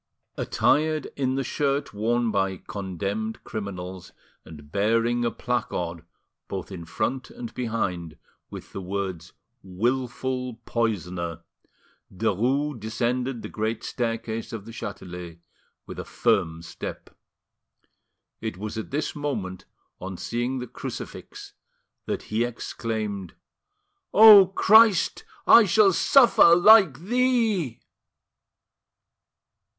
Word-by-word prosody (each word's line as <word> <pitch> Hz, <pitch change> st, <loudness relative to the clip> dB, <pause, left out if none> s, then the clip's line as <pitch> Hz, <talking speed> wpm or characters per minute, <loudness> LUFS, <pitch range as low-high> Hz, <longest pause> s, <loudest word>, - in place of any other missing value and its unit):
Attired 155 Hz, 0 st, +1 dB
in 130 Hz, -2 st, -1 dB
the 135 Hz, -, -1 dB
shirt 140 Hz, 0 st, -1 dB
worn 115 Hz, +2 st, 0 dB
by 95 Hz, -2 st, 0 dB
condemned 100 Hz, +4 st, -5 dB
criminals, 95 Hz, -4 st, -7 dB, 0.3 s
and 75 Hz, -2 st, -13 dB
bearing 115 Hz, +5 st, +1 dB
a 120 Hz, -, +2 dB
placard 90 Hz, -10 st, -3 dB, 0.4 s
both 95 Hz, 0 st, -6 dB
in 85 Hz, -3 st, -7 dB
front 120 Hz, -, -3 dB
and 235 Hz, 0 st, -8 dB
behind, 90 Hz, -10 st, -3 dB, 0.3 s
with -, -, -10 dB
the 95 Hz, -, -5 dB
words 95 Hz, -3 st, -5 dB, 0.3 s
"Wilful 125 Hz, +5 st, -2 dB
Poisoner," 90 Hz, -7 st, -2 dB, 0.7 s
Derues 120 Hz, +8 st, 0 dB
descended 120 Hz, +3 st, -2 dB
the -, -, -5 dB
great 110 Hz, +1 st, -3 dB
staircase 115 Hz, -2 st, -3 dB
of 110 Hz, -3 st, -7 dB
the 115 Hz, -, -9 dB
Chatelet 90 Hz, -6 st, -8 dB, 0.5 s
with -, -, -9 dB
a -, -, -4 dB
firm 80 Hz, +1 st, 0 dB
step. -, -, -8 dB, 1.3 s
It -, -, -4 dB
was 110 Hz, +2 st, -5 dB
at 110 Hz, -, -7 dB
this 145 Hz, +2 st, -3 dB
moment, 105 Hz, -12 st, -4 dB, 0.3 s
on 95 Hz, 0 st, -6 dB
seeing 120 Hz, +6 st, -2 dB
the 125 Hz, -, -4 dB
crucifix, -, -, -8 dB, 0.5 s
that -, -, -3 dB
he 110 Hz, +2 st, -1 dB
exclaimed, 110 Hz, -5 st, -4 dB, 0.8 s
"O 210 Hz, -3 st, +10 dB
Christ, 215 Hz, +1 st, +4 dB, 0.2 s
I 230 Hz, -, +8 dB
shall 200 Hz, 0 st, +4 dB
suffer 235 Hz, -5 st, +6 dB
like 190 Hz, -6 st, +7 dB
Thee!" 220 Hz, -, +1 dB
115 Hz, 105 wpm, -25 LUFS, 95-135 Hz, 1.3 s, O